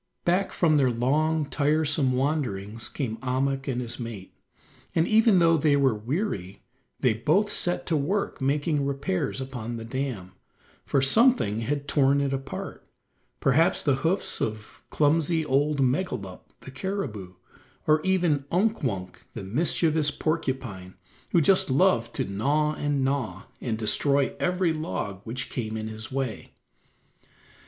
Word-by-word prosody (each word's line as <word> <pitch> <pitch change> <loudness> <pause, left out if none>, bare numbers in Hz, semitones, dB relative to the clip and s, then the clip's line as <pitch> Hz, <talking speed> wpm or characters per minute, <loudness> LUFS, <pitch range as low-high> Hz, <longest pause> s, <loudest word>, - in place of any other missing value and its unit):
Back 185 +3 +2
from 155 -4 +3
their 135 -3 +4
long, 150 +6 +1
tiresome 145 -1 +1
wanderings 120 -7 -2
came 115 -6 -3
Ahmuk 135 +2 -1
and 125 -2 -1
his 120 0 -3
mate, 115 -6 -7 0.6
and 165 +1 +3
even 220 -2 +5
though 165 -1 +5
they 150 -1 +3
were 135 -3 +3
weary 105 - -3 0.4
they 125 -4 +3
both 160 - +1
set 175 0 -1
to 165 - 0
work 160 +4 -1
making 145 +2 +1
repairs 140 -7 -2
upon 125 -3 -5
the 115 - -7
dam, 120 -7 -4 0.6
for 135 - +2
something 220 - +4
had 145 +5 -2
torn 140 -1 +3
it 140 -1 0
apart; 135 -8 -6 0.6
perhaps 150 +5 +3
the 140 -3 +2
hoofs 165 +8 -1
of 110 0 -4
clumsy 160 +2 +2
old 145 +1 +1
Megalup, 125 - -2
the 130 - -10
caribou, 130 - -4 0.5
or 155 0 +4
even 175 -6 +1
Unk 210 +6 +1
Wunk 95 - -4
the - - -5
mischievous 155 - +1
porcupine, 130 - -3 0.4
who 170 - +4
just 185 +2 +4
loved 130 -5 +2
to - - 0
gnaw 145 +10 0
and 145 -2 -1
gnaw, 125 -9 -2 0.2
and 115 -4 -2
destroy 140 +5 +2
every 180 -2 +1
log 100 -10 -4
which 125 +4 -5
came 110 -3 -3
in 110 0 -4
his 110 +1 -8
way. 130 -4 -4
140 Hz, 140 wpm, -26 LUFS, 115-155 Hz, 0.6 s, even